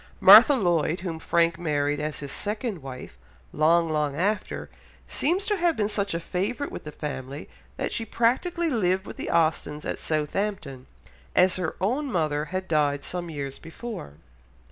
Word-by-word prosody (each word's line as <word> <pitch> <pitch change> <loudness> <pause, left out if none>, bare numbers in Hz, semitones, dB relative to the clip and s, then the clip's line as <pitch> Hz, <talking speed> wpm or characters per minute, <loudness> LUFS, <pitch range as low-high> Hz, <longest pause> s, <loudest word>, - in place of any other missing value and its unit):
Martha 290 - +9
Lloyd, 175 - +1
whom 170 -4 -4
Frank 170 +1 +1
married 145 -3 0
as 150 0 -3
his 140 -2 -6
second 210 - -3
wife, 130 - -9 0.3
long, 165 +2 +3
long 150 -3 -1
after, 205 +7 -1 0.4
seems 360 +7 0
to 420 -1 +1
have 340 -2 +1
been 210 -1 +1
such 200 -4 -1
a - - -1
favourite 205 +11 -3
with - - -7
the 150 - -6
family 140 -2 -6 0.3
that - - -2
she 230 - -1
practically 315 +10 0
lived 190 -5 +1
with - - -9
the - - -4
Austens 155 -2 0
at - - -3
Southampton, 155 -3 -2 0.5
as 185 0 +4
her 180 -3 -2
own 260 +9 -1
mother 155 -5 0
had 185 +3 -4
died 145 -3 +1
some 175 -1 -4
years 140 -3 -5
before. 165 - -8
170 Hz, 165 wpm, -26 LUFS, 150-210 Hz, 0.5 s, Martha